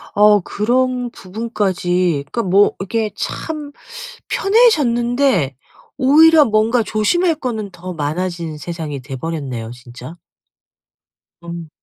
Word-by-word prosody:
아 210 0 +5
그런 250 +4 0
부분까지 185 -6 -1
그러니까 235 - -1
뭐 195 +2 +4
이렇게 215 +2 -2
참 300 -3 -5 0.6
편해졌는데 255 - +2 0.4
오히려 305 +3 +6
뭔가 220 +2 +2
조심할 320 - +1
거는 220 -8 -4
더 180 +1 -8
많아진 165 +1 -3
세상이 155 -3 -6
돼버렸네요 130 -4 -5
진짜. 125 +5 -11 1.3
음. 170 -1 -7
205 Hz, 235 characters per minute, -18 LUFS, 165-245 Hz, 1.3 s, 오히려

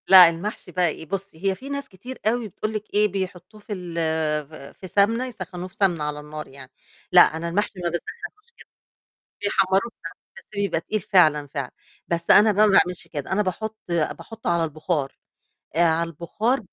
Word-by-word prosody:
لأ، 185 -3 +10
المحشي 180 +2 -6
بقى 180 0 +2
إيه، 160 - -7
بُصّي، 195 -1 -6
هي 195 -1 +2
في 265 +9 -10
ناس 280 0 -4
كتير 245 +7 -10
أوي 235 0 +1
بتقول 215 +3 -4
لِك 215 -1 -3
إيه، 210 +1 +4
بيحطّوه 190 +1 -5
في 205 - -6
ال 180 -3 -7 0.5
ف 155 - -20 0.3
في 190 - -8
سَمنة 225 +6 +2
يسخّنوه 185 -6 -7
في 185 - -19
سَمنة 180 -7 +2
على 150 0 -3
النار 150 +1 -8
يعني 135 -1 -12 0.4
لأ، 180 - +9
أنا 160 +1 +2
المحشي 195 +2 -1
ما 170 - +1
باسخّنوش 420 - -7
كده، - - -15 0.7
بيحمّروه 195 +2 +2
فعلًا 165 - -7 0.2
بس 190 - -11
بيبقى 200 -5 0
تقيل 215 +4 -2
فعلًا، 155 -6 +4
فعلًا، 135 -2 -5 0.4
بس 170 0 +1
أنا 215 +1 +7
بقى 210 +1 +4
ما 200 - +2
باعملش 180 -1 +1
كده، 145 -4 -6
أنا 195 +2 +2
باحُط 215 +3 -3
باحُطه 175 +6 -2
على 170 -1 +2
البُخار، 155 -2 -2 0.6
آآ، - - +3
على 165 0 +2
البُخار 210 - -1
185 Hz, 185 wpm, -24 LUFS, 165-210 Hz, 0.7 s, لأ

